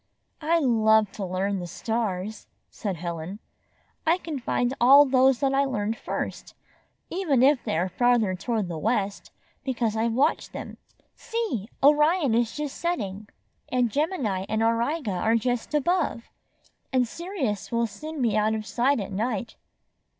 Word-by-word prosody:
"I 325 +3 +2
love 220 -7 +3
to 200 - -6
learn 190 +2 -1
the 175 - -5
stars," 215 0 -3 0.2
said 200 -4 -4
Helen. 170 +2 -5 0.7
"I 330 +3 +3
can 320 -6 -5
find 245 +1 0
all 275 +4 +8
those 265 0 +3
I 275 0 +3
learned 220 -4 -1
first, - - -5 0.6
even 310 -9 +2
if 275 -1 +4
they - - -1
are 175 +3 +1
farther 230 0 +2
toward 215 +1 -2
the 165 -2 -5
west, 205 0 -1 0.3
because 235 -5 -1
I've 225 +1 0
watched 285 +7 +1
them. - - -7 0.4
See! 430 - -3
Orion 300 -1 +4
is 230 0 +1
just 295 -2 -4
setting, 215 - -3 0.4
and 245 -3 +1
Gemini 240 - -1
and 220 +1 +1
Am 230 0 +4
iga 235 - -1
are 225 +1 +3
just 245 +4 -1
above. 300 -5 0 0.6
And 255 -2 +2
Sirius 285 - -4
will 235 0 +1
soon 305 +5 -5
be 225 -3 +2
out 215 +1 +2
of 215 -1 -4
sight 255 +4 +1
at 200 - -5
night." 220 +2 -2
235 Hz, 150 wpm, -26 LUFS, 210-280 Hz, 0.7 s, all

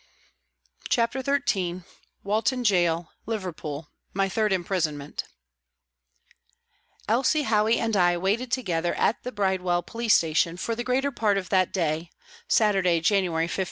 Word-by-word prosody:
CHAPTER 235 +2 +1
XIII 200 -11 -1 0.4
WALTON 225 +5 0
GAOL, 175 -5 +2 0.2
LIVERPOOL: 165 -8 -5 0.3
MY 195 0 +1
THIRD 215 +2 0
IMPRISONMENT 165 -6 -2 1.8
ELSIE 265 +7 +2
HOWEY 220 -1 +2
and 225 -2 -1
I 175 -2 +3
waited 210 +8 -1
together 175 -10 -1
at 225 - +1
the 250 - -5
Bride 190 -4 0
well 175 -1 0
Police 230 -1 +1
Station 165 +1 +1
for 230 - -2
the 240 +1 -3
greater 265 +3 0
part 215 -5 +1
of 185 -2 -4
that 185 -2 +2
day 165 -2 -1 0.4
(Saturday, 195 -6 +3
January 170 -2 +1
15). 170 - -4
195 Hz, 130 wpm, -26 LUFS, 175-230 Hz, 1.8 s, I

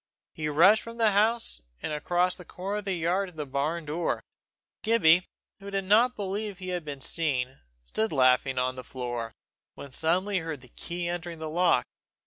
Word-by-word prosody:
He 155 - -3
rushed 185 +9 +6
from 230 0 -9
the 225 -2 +4
house, 215 - +2 0.2
and 150 - -3
across 175 +4 +1
the 180 - -10
corner 190 +4 -4
of 210 - -5
the 195 -2 0
yard 180 +4 0
to 180 - -18
the 150 -2 -4
barn 150 +5 -2
door. 160 +3 -1 0.6
Gibbie, 180 -6 +4 0.3
who 200 0 -8
did 195 -1 -1
not 225 +6 +4
believe 200 0 -3
he 185 -1 -6
had 180 -2 -2
been 145 -2 -6
seen, 135 -5 -1 0.3
stood 110 - -1
laughing 130 -1 +3
on 130 0 +1
the 130 - -7
floor, 120 -2 -4 0.4
when 140 - -9
suddenly 185 +8 +1
he - - 0
heard 160 -4 -5
the 125 - -14
key 175 +6 -4
entering 175 -1 -4
the 160 -1 -5
lock. 175 +1 +3
170 Hz, 190 wpm, -28 LUFS, 140-195 Hz, 0.6 s, rushed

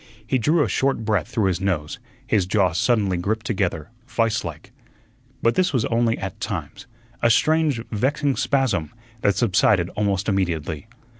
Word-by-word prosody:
He 130 +3 +1
drew 150 +6 +3
a - - 0
short 135 -4 0
breath 105 -8 +1
through 110 - 0
his 95 -1 0
nose; 85 -6 -2 0.3
his 95 -4 +1
jaws 95 -4 +2
suddenly 105 -7 +2
gripped 110 +5 -2
together 90 -7 -2 0.2
vise 115 -2 0
like. 80 -3 -8 0.7
But 115 - +4
this 185 -4 +1
was 125 -4 +1
only 115 0 +1
at 95 -1 -6
times - - -5 0.3
a 115 - +4
strange, 155 +1 +3
vexing 135 +5 0
spasm, 115 - +1 0.3
that 100 - +2
subsided 95 -5 +3
almost 100 -2 -1
immediately. 85 -3 -1
105 Hz, 155 wpm, -23 LUFS, 95-120 Hz, 0.7 s, But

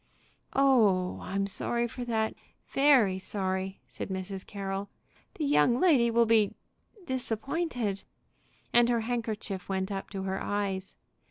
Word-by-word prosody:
"Oh, 215 -10 +3
I'm 195 +1 -1
sorry 235 +4 -1
for 245 +2 -6
that, 220 -2 0 0.4
very 255 -10 +4
sorry!" 190 -1 -3
said - - -6
Mrs. 190 0 -4
Carroll. 195 0 -4 0.5
"The 310 - -2
young 250 -4 +4
lady 275 -10 +5
will 235 0 +4
be 220 -3 +3 0.5
disappointed." 245 - -2 0.7
And 240 0 +5
her 235 -1 +2
handkerchief 220 -5 -3
went 190 +1 -1
up 195 -1 -4
to 195 -1 -5
her 190 0 -2
eyes. 195 -2 -2
210 Hz, 125 wpm, -29 LUFS, 195-240 Hz, 0.7 s, lady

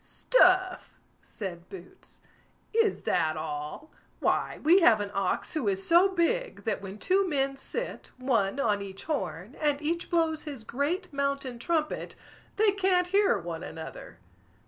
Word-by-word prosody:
"Stuff!" 370 -5 +2 0.2
said 180 -4 -8
Boots; 185 -2 -13 0.5
"is 445 -2 +2
that 155 -1 +1
all? 150 - -6 0.3
why, - - 0
we 340 +6 +6
have 230 -9 +6
an 205 -1 -4
ox 195 -2 -1
who 300 -9 -1
is 195 -1 0
so 345 +3 +6
big, 475 +8 0
that 225 - -1
when 195 +1 -8
two 380 - +1
men 275 -2 0
sit, 475 - -5
one 250 -3 0
on 210 -6 +1
each 195 -1 -8
horn, 190 - -4
and 295 -2 +1
each 335 +3 -2
blows 325 -3 +1
his 280 -7 -7
great 300 - -2
mountain 275 -3 -2
trumpet, 310 +4 -2 0.4
they 425 0 +4
can't 375 -2 +2
hear 400 - +4
one 170 -3 -6
another." 160 - -8
280 Hz, 145 wpm, -28 LUFS, -, 0.5 s, we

